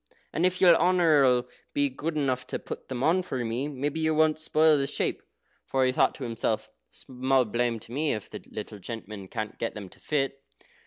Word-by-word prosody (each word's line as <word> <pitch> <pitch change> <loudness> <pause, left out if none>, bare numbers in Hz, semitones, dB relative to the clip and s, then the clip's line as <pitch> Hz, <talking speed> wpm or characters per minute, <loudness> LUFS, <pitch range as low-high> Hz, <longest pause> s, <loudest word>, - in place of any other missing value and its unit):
"And 175 +3 +3
if 185 0 -2
your 175 -3 +7
honour 170 -4 +4
'll 125 -1 +2 0.3
be 145 0 +3
good 155 +4 -4
enough 130 -3 0
to - - -3
put - - -8
them 130 -1 -3
on 175 +5 +4
for 130 -9 -3
me, 120 +5 -2
maybe 145 +2 -3
you 160 0 +1
won't 155 0 +3
spoil 155 0 +4
the 135 - 0
shape." 145 - -1 0.5
For 135 -1 +2
he 130 - +3
thought - - +2
to 140 - -7
himself, 115 -2 -2 0.2
"Small 130 0 0
blame 120 +1 0
to - - -12
me 150 +4 0
if 105 - -5
the - - -9
little 105 - -7
gentleman 105 -1 -7
can't 110 +2 -5
get 115 - -2
them 100 -3 -7
to - - -17
fit." 135 -2 -1
135 Hz, 210 wpm, -27 LUFS, 120-155 Hz, 0.5 s, your